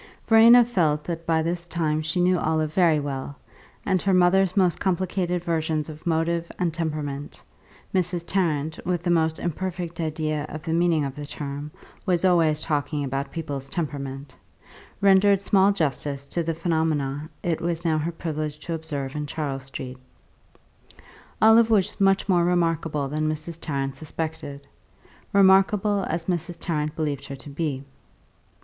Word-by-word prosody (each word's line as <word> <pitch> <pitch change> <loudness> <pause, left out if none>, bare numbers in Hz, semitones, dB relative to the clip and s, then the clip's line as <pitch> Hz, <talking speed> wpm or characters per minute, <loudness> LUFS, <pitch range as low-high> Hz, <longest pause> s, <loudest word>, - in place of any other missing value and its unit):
Verena 230 +2 +7
felt 160 -10 +1
that 165 0 -5
by 160 -1 +2
this 170 +1 -3
time 155 -2 0
she 155 +3 -2
knew 180 0 +3
Olive 155 -1 0
very 165 -4 +4
well, 140 -1 -4 0.5
and 190 -3 +1
her 195 -1 +2
mother's 185 +1 +3
most 180 -3 +3
complicated 180 -1 -1
versions 160 -2 -1
of 155 +3 -9
motive 170 +1 0
and 175 -3 0
temperament 150 -3 -4 0.5
(Mrs. 180 -2 0
Tarrant, 160 -5 0
with 175 -2 -1
the 175 - +1
most 160 -1 +2
imperfect 175 0 -4
idea 155 -2 -2
of 155 0 -7
the 160 -1 -2
meaning 165 -3 +2
of 135 - -4
the 145 +1 -7
term, 145 0 -6 0.3
was 180 0 +1
always 165 -4 +3
talking 145 -1 -1
about 135 +1 -3
people's 145 -5 -5
temperament) 140 -4 -5 0.7
rendered 200 0 +5
small 195 0 +4
justice 145 -5 -2
to 170 - -1
the 165 0 -2
phenomena 155 -3 -1
it 170 -2 -1
was 170 0 -2
now 160 -2 +2
her 160 +3 -2
privilege 155 -2 -4
to 165 +2 -6
observe 145 -4 -4
in 150 0 -3
Charles 140 -3 -4
Street. 130 -1 -7 1.4
Olive 225 +1 +6
was 205 -2 +1
much 195 0 +3
more 180 -3 +3
remarkable 165 -4 0
than 155 +2 -1
Mrs. 155 +2 -5
Tarrant 135 -2 -2
suspected, 155 -2 -6 0.6
remarkable 195 +1 +4
as 165 +1 -2
Mrs. 175 -1 -2
Tarrant 150 -2 -2
believed 150 -4 -3
her 140 - -6
to 135 +2 -12
be. 140 -3 -3
160 Hz, 155 wpm, -24 LUFS, 150-175 Hz, 1.4 s, Verena